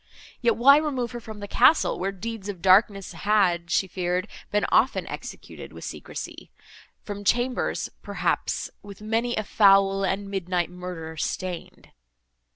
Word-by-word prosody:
Yet, 235 -2 +3
why 275 +5 +7
remove 265 -6 -1
her 240 - -6
from 220 -2 -10
the 205 - -5
castle, 255 +9 +4
where 190 +2 -1
deeds 205 +1 -6
of 195 -3 -5
darkness 195 +1 +3
had, 175 -2 +1
she 190 - +1
feared, 180 +1 -2 0.2
been 210 - +1
often - - +3
executed - - -8
with - - -10
secrecy?—from 205 -1 -9
chambers, 245 +4 0
perhaps - - -2
With 205 0 -12
many 225 +3 0
a 215 - -1
foul, 195 -1 +4
and 195 +1 -1
midnight 180 -2 -1
murder 180 -3 -7
stain'd. 180 +2 -5
200 Hz, 140 wpm, -25 LUFS, 185-225 Hz, 0.2 s, why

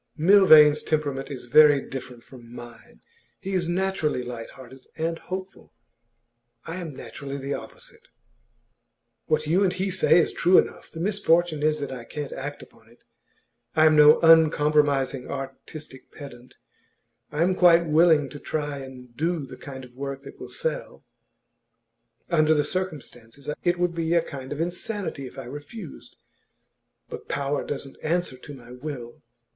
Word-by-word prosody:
'Milvain's 155 -4 +7
temperament 145 -3 -2
is 130 -4 -7
very 145 +3 +6
different 125 -3 -8
from 120 -3 -15
mine. 120 - -13 0.4
He 195 - -5
is 180 -3 0
naturally 175 -7 -1
light 120 -2 -7
hearted 130 0 -14
and 165 +1 -2
hopeful; 185 +1 -8 0.9
I 165 - -6
am 165 -6 -7
naturally 135 +4 -7
the 140 +1 -4
opposite. 485 - -10 1.2
What 155 0 +1
you 175 +6 +2
and 190 - +2
he 190 +1 -2
say 185 -2 +4
is 170 - +2
true 180 +2 +4
enough; - - 0
the 165 - -10
misfortune 175 -5 +1
is 155 0 +1
that 140 -2 -4
I 125 -3 -7
can't 145 +1 -6
act 145 +2 -6
upon 115 0 -20
it. 120 - -24 0.7
I 155 - +5
am 155 0 +5
no 150 0 +7
uncompromising 150 -5 +3
artistic 135 +1 -8
pedant; 125 -3 -12 0.8
I 155 +3 +1
am 185 +2 +2
quite 175 -2 +5
willing 160 -2 +4
to 145 - -10
try 145 -2 -3
and 125 -2 -11
do 165 +1 -1
the 130 - -11
kind 130 -1 -9
of 120 - -18
work 140 0 -5
that - - -12
will 125 - -9
sell; 145 +2 -5 1.2
under 155 -2 +3
the 145 - +2
circumstances 145 -7 -6 0.2
it 175 0 +1
would 175 -1 0
be 165 0 -1
a 170 - +3
kind 135 -4 -8
of 145 - -4
insanity 175 -3 -4
if - - -14
I - - -6
refused. 145 - -10 0.9
But - - -9
power 140 0 -1
doesn't 135 -1 -6
answer 170 -4 -1
to 145 - -11
the 120 -1 -13
will. 130 -6 -7
150 Hz, 155 wpm, -25 LUFS, 135-170 Hz, 1.2 s, Milvain's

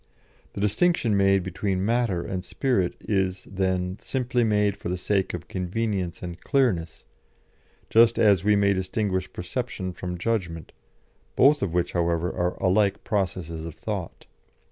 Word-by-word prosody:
The 100 - -5
distinction 110 - +2
made 95 -1 +3
between 95 +1 -2
matter 115 -6 +1
and 90 -1 -4
spirit 100 -4 0
is, 95 -2 -1
then, 95 -1 -2
simply 125 -2 0
made 105 -2 +2
for 100 - -6
the 90 - -1
sake 95 +1 0
of 85 0 -8
convenience 95 -1 -2
and 85 -1 -7
clearness, 105 - 0 0.8
just 115 +1 +5
as 100 -6 +4
we 105 +1 +4
may 100 -1 +3
distinguish 95 0 -2
perception 95 -1 -4
from 90 0 -5
judgment, 85 -5 -2 0.6
both 145 +3 +5
of 90 -4 -2
which, 90 0 +1
however, 85 0 0
are 90 0 0
alike 100 +2 +1
processes 90 -5 -2
of 80 -2 -7
thought. - - -5
95 Hz, 145 wpm, -25 LUFS, 90-105 Hz, 0.8 s, just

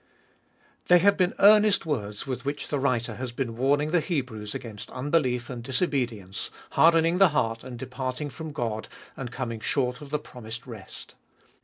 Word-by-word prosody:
THEY 180 - +8
have 200 +3 +5
been 180 -2 +1
earnest 210 -1 +6
words 105 -9 -3
with 130 -2 -4
which 140 +1 -3
the 145 - 0
writer 120 -4 0
has 130 -1 -4
been 120 -2 -3
warning 145 +5 +2
the 175 - +4
Hebrews 125 - -3
against 110 -4 -7
unbelief 130 -3 0
and 125 -3 -6
disobedience, 125 - -1 0.2
harden 165 0 +5
ing 170 +2 +1
the 195 -2 +7
heart 115 -6 0
and 125 -1 -7
departing 130 +3 -4
from 160 +4 -7
God, 115 -6 -3 0.3
and 125 -3 -6
coming 115 -4 -4
short 125 +2 0
of 145 - -9
the 150 - +1
promised 120 -5 -9
rest. 110 -6 -10
130 Hz, 170 wpm, -27 LUFS, 120-150 Hz, 0.3 s, THEY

